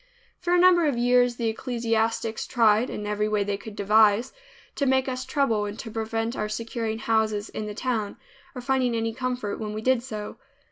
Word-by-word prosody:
For 355 -1 +1
a - - +4
number 350 -2 +5
of 275 -5 0
years 245 0 +3
the 235 -1 -2
ecclesiastics 225 -1 -1
tried, 225 0 +3
in 210 - -5
every 210 0 -1
way 210 -1 +1
they 200 0 -2
could 205 +1 -9
devise, 210 +3 +3 0.4
to 280 - +1
make 265 0 +2
us 255 0 -3
trouble 230 -8 +1
and 205 +1 -6
to 225 - -7
prevent 225 +1 -2
our 215 - -2
securing 225 0 -3
houses 220 -2 0
in 215 - -5
the 210 - -6
town, 225 -4 -2 0.4
or 250 - -5
finding 255 -2 +1
any 225 0 -1
comfort 250 -4 -3
when 210 -1 -4
we 215 - -4
did 255 -1 +3
so. 215 -4 -7
225 Hz, 195 wpm, -25 LUFS, 215-250 Hz, 0.4 s, number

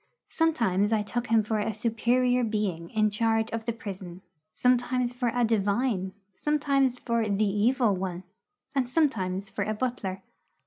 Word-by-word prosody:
Sometimes 230 - +1
I 215 -2 +2
took 240 +4 -3
him 225 -1 +3
for 215 0 -1
a 215 +2 -1
superior 245 +3 +1
being 205 -7 -2
in 215 -1 +1
charge 225 +1 +1
of 225 -1 -4
the 235 - 0
prison, 190 -5 -8 0.3
sometimes 250 +3 +1
for 245 -1 0
a 245 +1 +1
divine, 205 -2 0 0.2
sometimes 275 -2 +1
for 235 -3 -1
the 205 +2 +2
Evil 215 +2 +2
One, 185 -1 -4 0.5
and 265 -4 0
sometimes 200 - 0
for 200 - -2
a 215 - -2
butler. 210 -6 -3
225 Hz, 150 wpm, -27 LUFS, 200-245 Hz, 0.5 s, him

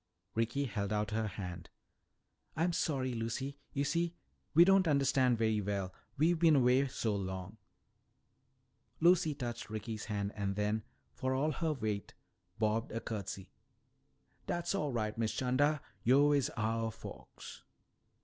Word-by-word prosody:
Ricky 120 +5 0
held 100 -4 -3
out 105 0 0
her 110 0 0
hand. 90 -4 -6 0.9
"I'm 170 +3 +1
sorry, 135 -7 0
Lucy. 120 +5 -3
You 140 - 0
see, 170 +3 0 0.4
we 170 +2 +9
don't 195 -1 +5
understand 135 -4 +3
very 110 -1 +2
well, 100 -2 -2 0.2
we've 165 +3 +3
been 160 -2 +6
away 130 +1 +4
so 110 -4 -1
long." 95 +1 -4 1.4
Lucy 170 -3 +4
touched 120 -4 -5
Ricky's 110 0 -5
hand 100 -2 -2
and 100 -2 -2
then, 105 +2 0 0.3
for 130 0 -1
all 150 +4 +1
her 160 0 0
weight, 110 -6 -3 0.4
bobbed 110 +1 0
a 115 - -2
curtsy. 100 -4 -5 1.0
"Dat's 175 +1 -1
all 150 -8 0
right, 110 -3 -1
Miss 110 -1 0
'Chanda, 140 +4 +2 0.2
yo' 140 +4 +5
is 140 -4 +2
ouah 115 +1 0
folks." - - -10
120 Hz, 140 wpm, -34 LUFS, 105-145 Hz, 1.4 s, we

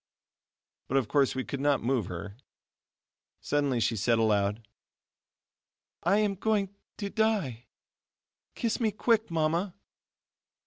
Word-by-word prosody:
But 135 - +1
of 130 -5 +1
course 140 0 +2
we 130 - -1
could 140 - -5
not 140 -3 +2
move 120 -5 +1
her. 100 +3 -6 1.0
Suddenly 145 -4 0
she 115 +1 +1
said 115 +3 +2
aloud: 105 -1 +1 1.3
"I 185 +5 +3
am 210 -1 +2
going 200 0 0 0.2
to 200 -2 -4
die! 195 - 0 0.9
kiss 230 -3 -1
me 225 -3 +2
quick, 220 +2 +1
Mama." 165 +3 0
145 Hz, 120 wpm, -29 LUFS, -, 1.3 s, I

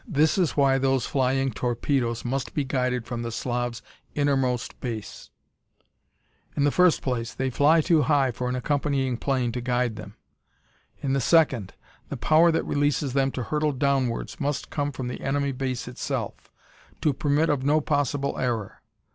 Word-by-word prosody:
"This 155 -1 +2
is 175 -5 +1
why 135 -1 +4
those 135 -2 +1
flying 135 0 +1
torpedoes 120 +1 -1
must 135 +2 -3
be 145 - +1
guided 125 -2 -1
from 120 -2 -4
the 115 0 -4
Slav's 120 0 -3 0.3
innermost 135 -4 0
base. 115 -4 -6 1.3
"In 140 - +2
the 145 - +3
first 180 0 +3
place, 120 -3 -2
they 130 0 -1
fly 150 +6 +4
too 165 -1 +3
high 140 -4 +2
for 125 +1 -3
an 125 - -1
accompanying 135 -1 0
plane 130 -2 0
to 125 +1 -4
guide 120 -2 0
them. 105 -1 -9 0.9
In 135 -1 0
the 135 - +1
second, 130 - +2 0.3
the - - -4
power 165 +2 +4
that 165 - 0
releases 145 -2 0
them 135 0 +2
to 125 - -3
hurtle 150 +4 0
downwards 135 0 -1
must 145 -1 -2
come 145 -1 -1
from 130 -2 -5
the 125 - -5
enemy 140 0 0
base 130 -1 -3
itself, 125 - -5 0.5
to 150 - +2
permit 150 +4 +1
of 140 -3 -1
no 150 +3 +3
possible 145 -2 -1
error. 115 -5 -2
135 Hz, 165 wpm, -25 LUFS, 125-145 Hz, 1.3 s, why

